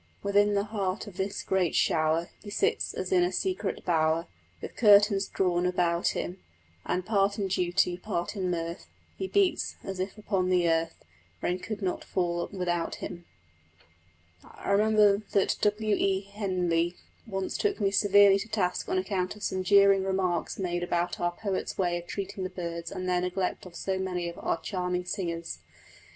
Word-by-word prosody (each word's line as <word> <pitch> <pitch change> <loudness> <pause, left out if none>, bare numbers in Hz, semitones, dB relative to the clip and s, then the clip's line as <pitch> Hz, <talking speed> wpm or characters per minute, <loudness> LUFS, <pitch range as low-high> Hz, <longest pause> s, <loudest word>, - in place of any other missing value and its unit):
Within 205 +1 +3
the 200 - +2
heart 205 -2 -2
of 200 -4 -11
this 195 +1 -2
great 185 -3 +1
shower 160 +1 +2
He 210 - -9
sits, 415 - 0
as - - -4
in 360 -2 +4
a 355 - +1
secret 365 - -2
bower, 160 -1 +2 0.3
With - - -8
curtains 205 -2 +5
drawn 180 -2 0
about 175 -1 +1
him: 180 +2 -4 0.5
And, 180 0 -1
part 200 -1 +2
in 200 -2 -1
duty, 180 -1 +1
part 180 0 -3
in 185 -2 -1
mirth, 170 0 -3 0.3
He 380 - -3
beats, 395 -1 +1
as 195 -1 -5
if 190 +3 -3
upon 195 -3 -1
the 180 -2 +3
earth 165 0 +1 0.5
Rain 180 +1 0
could 210 +2 -5
not 185 - -1
fall 175 -2 -1
without 175 -3 -1
him. 175 0 -7 1.2
I - - -6
remember 210 0 +5 0.2
that 200 - +2
W. 210 0 +2
E. 195 -1 +1
Henley 180 -4 0 0.3
once 195 -3 -3
took 415 - 0
me 200 -2 +2
severely 200 0 +6
to 220 - -5
task 195 -5 -1
on - - +1
account 185 0 -1
of 210 - -11
some 185 - -1
jeering 200 0 +5
remarks 190 -3 -1
made 175 -2 -2
about 175 0 -1
our 175 0 0
poet's 195 0 -3
way 175 -2 +1
of 175 - -13
treating 195 -1 -4
the 185 - -2
birds 170 -2 -5
and 185 -1 -4
their 180 -1 +2
neglect 180 0 -2
of 175 - -14
so 190 +1 -2
many 180 -2 -2
of 170 - -7
our 165 - -1
charming 180 -2 -2
singers. 170 -2 -4
185 Hz, 175 wpm, -28 LUFS, 175-200 Hz, 1.2 s, severely